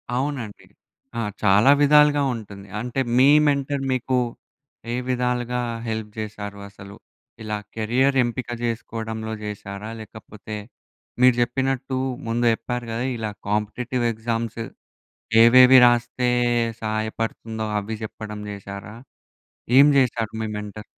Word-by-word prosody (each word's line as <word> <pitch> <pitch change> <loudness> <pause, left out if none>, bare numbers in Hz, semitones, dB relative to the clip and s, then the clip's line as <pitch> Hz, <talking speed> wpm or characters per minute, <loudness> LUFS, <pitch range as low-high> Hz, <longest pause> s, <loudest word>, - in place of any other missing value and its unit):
అవునండి. 130 -5 -4 0.5
ఆ! - - 0 0.2
చాలా 105 +6 +6
విధాలుగా 145 0 +5
ఉంటుంది. 100 -3 -10
అంటే 125 +4 -3 0.2
మీ 130 +2 +6 0.2
మెంటర్ 140 -1 0
మీకు 130 0 0 0.8
ఏ - - 0
విధాలుగా 125 -1 -1 0.3
హెల్ప్ 110 -1 -4
చేశారు 105 -1 -6
అసలు? 100 0 -12 0.5
ఇలా 105 0 -3 0.2
కెరియర్ 125 +5 +1
ఎంపిక 120 +1 -4
చేసుకోవడంలో 110 -1 -4
చేశారా? 105 0 -7
లేకపోతే 110 0 -10 0.7
మీరు 125 -1 +6
చెప్పినట్టు 135 +2 -1 0.3
ముందు 120 +1 0
చెప్పారు 120 +1 -4
కదా 115 +3 -2
ఇలా 110 -2 -3 0.2
కాంపిటీటివ్ 110 +4 -1
ఎగ్జామ్స్ 115 0 -3 0.8
ఏవేవి 125 +2 +8
రాస్తే 120 +1 +2 0.5
సహాయపడుతుందో 110 +1 -3
అవి 105 +2 -5
చెప్పడం 105 -1 -7
చేశారా? 100 +1 -8 0.8
ఏం 140 - +9
చేశారు 115 -4 +1
మీ - - -2
మెంటర్? 105 0 -7
115 Hz, 110 wpm, -23 LUFS, 105-125 Hz, 0.8 s, ఏం